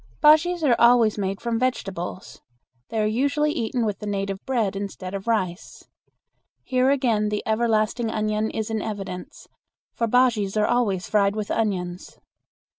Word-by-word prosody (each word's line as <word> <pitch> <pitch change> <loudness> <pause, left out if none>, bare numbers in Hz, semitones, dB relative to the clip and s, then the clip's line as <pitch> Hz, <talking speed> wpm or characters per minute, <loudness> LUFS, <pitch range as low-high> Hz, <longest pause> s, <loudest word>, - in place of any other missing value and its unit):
Bujeas 320 +3 +4
are 255 -5 +4
always 235 -3 +5
made 195 0 -2
from 235 -1 -1
vegetables. 195 -8 -4 0.5
They 220 -1 -1
are - - +1
usually 280 +7 +1
eaten 235 -5 -1
with 210 -2 -2
the 210 - -6
native 195 -1 -3
bread 230 -7 0
instead 195 -2 -6
of 195 +2 -6
rice. 190 -5 -2 0.8
Here 255 0 +2
again 235 -7 +1
the 210 0 -2
everlasting 220 +1 +1
onion 215 0 -1
is 220 0 -4
in 220 -1 -1
evidence, 195 -4 -7 0.5
for 230 - -1
bujeas 225 -4 +2
are 210 - +3
always 210 -7 0
fried 200 -1 +2
with 210 -1 -3
onions. 185 -5 -2
215 Hz, 150 wpm, -24 LUFS, 200-240 Hz, 0.8 s, always